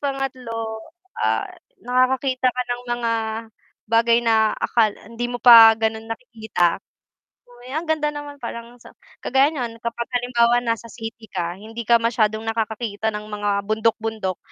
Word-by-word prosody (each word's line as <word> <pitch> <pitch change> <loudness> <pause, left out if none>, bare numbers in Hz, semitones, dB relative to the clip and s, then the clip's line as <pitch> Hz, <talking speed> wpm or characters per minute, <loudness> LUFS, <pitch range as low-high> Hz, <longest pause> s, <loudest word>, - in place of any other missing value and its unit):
pangatlo, 250 -5 -4 0.4
ah, - - +1 0.4
nakakakita 255 +1 +1
ka 250 0 -1
ng 245 0 -6
mga 230 -1 -1 0.8
bagay 230 +1 +4
na 220 -1 +3
akal 225 -2 +2 0.2
hindi 230 +2 -5
mo 245 - -3
pa 230 -2 +10
ganun 220 0 -1
nakikita, 220 -7 -1 0.7
uy 245 +1 -15
ang 320 +2 -2
ganda 300 -1 +1
naman 290 -1 -8
palang 235 +1 -7
sa - - -14 0.3
kagaya 270 +3 +3
niyan 235 -5 -4
kapag 235 0 -3
halimbawa 240 -1 +2
nasa 230 -1 -2
city 225 0 -8
ka 175 -1 -3
hindi 225 +3 -8
ka 235 +1 +5
masyadong 220 -2 +1
nakakakita 220 -1 -2
ng 210 0 -5
mga 205 0 -2 0.2
bundok-bundok. 220 -3 -1
230 Hz, 140 wpm, -22 LUFS, 220-245 Hz, 0.8 s, pa